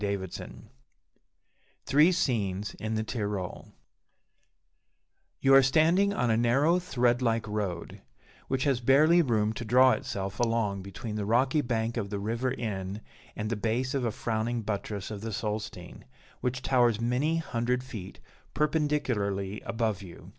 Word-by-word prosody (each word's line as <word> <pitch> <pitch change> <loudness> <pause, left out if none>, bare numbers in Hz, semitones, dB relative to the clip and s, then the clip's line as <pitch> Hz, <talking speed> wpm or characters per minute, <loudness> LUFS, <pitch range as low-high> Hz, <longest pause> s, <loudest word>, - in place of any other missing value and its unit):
Leigh 100 0 0
Hunt 95 -2 -8 1.2
THREE 150 +6 +5
SCENES 105 - -1
IN 110 +2 -2
THE 110 - 0
TYROL 105 -5 -4 1.7
You 135 0 +5
are 135 - +9
standing 165 +9 +3
on 125 - +1
a - - +3
narrow, 135 +9 +3
thread 125 -8 +1
like 115 -2 0
road, 100 -5 -4 0.5
which 130 0 0
has 135 -4 +2
barely 150 +8 +5
room 110 -7 +1
to 120 - -5
draw 125 +3 +5
itself 100 -9 -3
along 115 -4 0
between 105 +3 -6
the 105 - -2
rocky 130 +7 +2
bank 115 -2 -2
of 100 -4 -2
the 100 - -3
River 115 +5 -1
Inn, 100 -4 -4 0.3
and 105 +1 -3
the - - +1
base 115 +5 -1
of 135 -2 -1
a 115 - 0
frowning 115 +1 -2
buttress 100 -1 -4
of 105 -2 -6
the 115 - -4
Solstein, 105 - -5 0.3
which 125 +1 -2
towers 120 -4 +3
many 125 +8 +1
hundred 125 -4 -1
feet 110 -8 -9 0.4
perpendicularly 125 -11 0
above 115 -4 -1
you. 90 -3 -11
115 Hz, 145 wpm, -28 LUFS, 105-130 Hz, 1.7 s, are